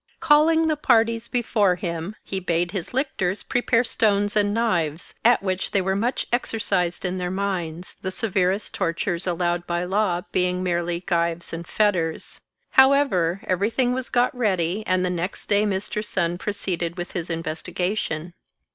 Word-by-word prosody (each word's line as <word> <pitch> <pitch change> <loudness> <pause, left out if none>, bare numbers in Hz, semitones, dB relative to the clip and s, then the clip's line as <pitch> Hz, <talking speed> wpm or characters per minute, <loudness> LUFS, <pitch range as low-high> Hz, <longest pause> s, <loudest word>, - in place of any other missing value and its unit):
Calling 320 +1 +4
the 310 - +2
parties 230 -4 +2
before 215 -6 +2
him, 175 +2 -4
he 195 - -3
bade 175 -1 0
his 185 -4 -5
lictors 220 -8 -1
prepare 245 -1 +2
stones 205 -3 +1
and 205 -1 +3
knives, 180 -8 0
at 240 -2 +4
which 190 -1 -1
they 200 - +2
were 190 0 0
much 235 +6 -1
exercised 195 -8 0
in 185 +1 -2
their 180 0 -2
minds, 180 -3 -3
the 190 - -2
severest 190 -1 0
tortures 175 0 -1
allowed 175 0 -1
by 175 0 -1
law 185 -1 0
being 180 0 0
merely 175 -1 -1
gyves 170 -2 -1
and 165 +1 -6
fetters. 180 -7 0 0.3
However, 265 -11 +4
every 190 +3 +1
thing 245 +1 +1
was 255 -1 -3
got 245 +1 +2
ready, 195 -4 0
and 185 0 +2
the 180 - 0
next 180 +1 -4
day 205 +1 +3
Mr. 205 +2 -2
Sun 175 -4 -1
proceeded 180 -5 -2
with 175 0 -5
his 175 -1 -4
investigation. 165 +1 -3
190 Hz, 155 wpm, -24 LUFS, 175-215 Hz, 0.3 s, Calling